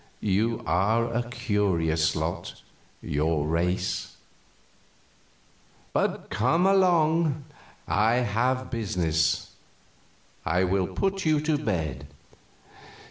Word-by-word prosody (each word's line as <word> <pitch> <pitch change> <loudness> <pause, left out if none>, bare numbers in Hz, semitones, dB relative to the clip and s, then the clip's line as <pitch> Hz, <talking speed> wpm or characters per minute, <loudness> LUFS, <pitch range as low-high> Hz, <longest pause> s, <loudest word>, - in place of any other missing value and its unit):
You 110 +3 0
are 110 +6 +1
a 120 0 -2
curious 95 -9 0
lot - - -4 0.4
your 75 +1 0
race. 90 +3 -1 1.8
But - - -1
come 130 - +2
along; 165 -6 +3 0.4
I 110 +3 +3
have 125 +2 0
business. 85 -8 0 0.9
I 90 +1 +1
will 95 0 +1
put 195 0 -1
you 155 -2 +3
to 155 0 +1
bed." 80 - -2
110 Hz, 85 wpm, -26 LUFS, 85-130 Hz, 1.8 s, along